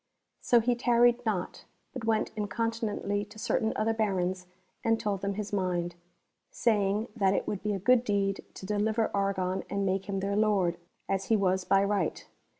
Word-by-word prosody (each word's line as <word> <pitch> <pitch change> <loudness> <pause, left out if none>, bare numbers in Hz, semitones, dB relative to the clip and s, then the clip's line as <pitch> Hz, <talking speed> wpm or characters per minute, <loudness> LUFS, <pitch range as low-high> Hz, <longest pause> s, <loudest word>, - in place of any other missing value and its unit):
So 240 -1 +4
he 245 +2 +2
tarried 240 0 +3
not, 185 -5 -2 0.3
but 255 -4 -5
went 220 -1 +1
incontinently 210 -1 -2
to 210 - -15
certain 220 0 0
other 225 +1 +1
Barons 185 -4 -1 0.4
and 225 0 +2
told 200 -2 -2
them 200 0 -2
his 210 0 -5
mind, 175 -3 -1 0.6
saying 210 -1 +1
that 195 -3 +2
it - - -1
would 205 - -3
be 210 -1 -1
a - - -1
good 245 +5 +4
deed 200 -3 0
to - - -8
deliver 215 +2 0
Argon 190 -2 0
and 200 0 -1
make 195 +1 -1
him 195 -1 -1
their 200 +1 -1
lord, 200 -5 +2 0.3
as 195 0 -1
he 225 - +3
was 190 -2 +1
by 195 0 +4
right. 200 0 -1
205 Hz, 175 wpm, -29 LUFS, 195-220 Hz, 0.6 s, So